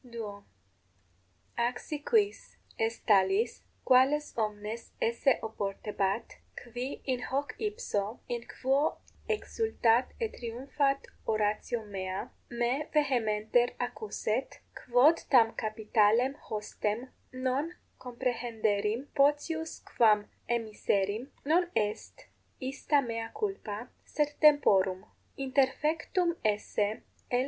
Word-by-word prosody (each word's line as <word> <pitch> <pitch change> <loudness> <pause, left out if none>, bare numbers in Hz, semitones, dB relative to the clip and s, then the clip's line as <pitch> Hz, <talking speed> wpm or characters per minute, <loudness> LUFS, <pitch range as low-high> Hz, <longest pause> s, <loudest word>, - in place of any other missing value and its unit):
_ - - -15
=2.= 210 -4 -7 1.2
Ac 240 +1 +1
si 300 - -5
quis 415 +4 +1 0.2
est 225 +1 -1
talis, 200 +3 +3 0.2
quales 270 +4 +4
omnes 215 0 -3
esse 235 +3 +2
oportebat, 205 0 -2 0.2
qui 245 +3 -6
in 255 -2 0
3 - - -5
hoc 270 -1 -1
ipso, 250 - -2
in 240 -1 -2
quo 275 +4 +1 0.3
exsultat 420 - +2
et 455 -2 -2
triumphat 275 +4 -1 0.2
oratio 215 +1 0
mea, 190 -2 -4 0.2
me 240 +5 0
vehementer 240 -4 +2
accuset, 240 0 -2 0.2
quod 255 +7 +4
tam 230 -4 +6
capitalem 220 +3 +2 0.2
hostem 215 +3 -3 0.2
non 260 +5 -1 0.3
comprehenderim 235 -2 -1
potius 300 +3 +1
quam 210 -3 +4 0.2
emiserim, 215 0 0 0.2
non 345 +4 +3
est 215 - -2 0.3
ista 280 +2 +1
mea 230 -2 -4
culpa, 390 - -3 0.2
sed 295 -1 -1
temporum. 195 -11 +5 0.3
Interfectum 300 +6 +1
esse 210 0 0 0.3
L. 245 - +2
240 Hz, 100 wpm, -30 LUFS, 215-280 Hz, 1.2 s, tam